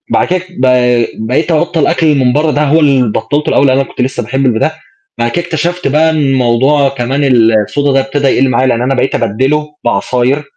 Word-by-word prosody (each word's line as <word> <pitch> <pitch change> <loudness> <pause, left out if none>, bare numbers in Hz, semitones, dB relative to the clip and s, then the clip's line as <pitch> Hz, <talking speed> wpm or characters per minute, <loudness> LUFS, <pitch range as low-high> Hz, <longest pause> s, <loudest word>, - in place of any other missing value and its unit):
بعد - - +1
كده 185 0 -1
ب 130 -8 -3 0.6
بقيت 155 +8 0
أبطّل 165 +1 0
الأكل 155 0 +2
من 125 -2 +1
برّه 150 +2 +1
ده، 150 - 0
هو 150 +2 +2
اللي 135 -7 +2
بطّلته 145 +7 -2
الأول، 140 - +2
أنا 130 +1 +2
كنت 130 - -7
لسّه 125 -1 -2
باحب 135 +5 -2
الب 115 -3 +1
ده، 155 - 0 0.5
بعد 120 0 0
كده 175 +6 -2
اكتشفت 170 +2 -3
بقى 155 +4 +2
إن 160 - -1
الموضوع 135 0 +1
كمان 135 +2 -2
الSoda 115 +4 +2
ده 135 - +3
ابتدى 135 +1 -1
يَقل 135 0 +2
معايا، 130 +1 +1
لإن 120 -2 0
أنا 135 +2 0
بقيت 130 - -1
أبدّله 150 +7 -1
بعصاير 125 +6 0
135 Hz, 205 wpm, -11 LUFS, 125-150 Hz, 0.6 s, ده